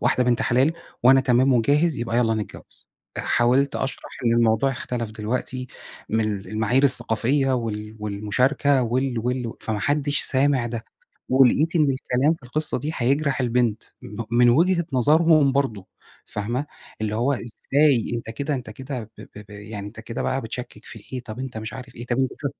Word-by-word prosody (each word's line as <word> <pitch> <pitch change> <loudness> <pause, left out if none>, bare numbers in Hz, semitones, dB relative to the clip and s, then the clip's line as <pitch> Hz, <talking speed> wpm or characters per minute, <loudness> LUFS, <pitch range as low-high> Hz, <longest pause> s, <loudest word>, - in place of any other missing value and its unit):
واحدة 125 - +2
بنت 120 -1 +2
حلال، 130 +6 +3 0.3
وأنا 135 +2 +7
تمام 130 +1 +3
وجاهز 145 +6 +2
يبقى 120 0 -2
يالّا 115 -2 +2
نتجوَّز، 105 -2 -8 0.3
حاولت 130 +4 +2
أشرح 135 -1 -4
إن 115 - +3
الموضوع 115 +2 +3
اختلف 120 -3 -4
دلوقتي، 125 +4 -3 0.4
من 110 - +1
ال 100 -1 -6
المعايير 110 +5 +1
الثّقافية، 130 +2 +2
وال 110 -2 -4
والمُشاركة 125 +7 +1
وال 125 +1 0
وال 125 0 -2
فما 110 -2 -3
حدش 145 +3 +1
سامع 135 -2 +2
ده، 115 -1 -5 0.4
ولقيت 135 +6 +4
إن 155 - +4
الكلام 135 +2 +1
في 160 - -18
القصّة 150 +5 0
دي 145 +5 -3
هيجرح 135 +3 +1
البنت، 120 -3 +1 0.2
م 105 +3 -6
من 120 +1 +5
وجهة 170 +6 +3
نظرهُم 150 +2 +4
برضه 115 -9 -1 0.4
فاهمة، 120 +7 -3 0.3
اللي 110 -1 -2
هو 120 +6 +1
إزاي 135 +1 +1
أنت 115 -1 -5
كده 140 +4 -2
أنت 125 -4 -5
كده 130 +3 -6 0.2
ب - - -9
ب - - -14 0.2
ب - - -18
يعني 105 0 -8
أنت 110 +2 -9
كده 115 +2 -5
بقى 135 - -1
بتشكِّك 120 +2 -7
في 115 - -10
إيه، 130 - -3
طَب 115 -1 -9
أنت 130 -4 -5
مش 110 0 -6
عارف 125 -1 -9
إيه، 120 +1 -8
طَب 120 +1 -1
أنت 130 0 +1
ش 145 - -6
125 Hz, 175 wpm, -23 LUFS, 115-135 Hz, 0.4 s, وأنا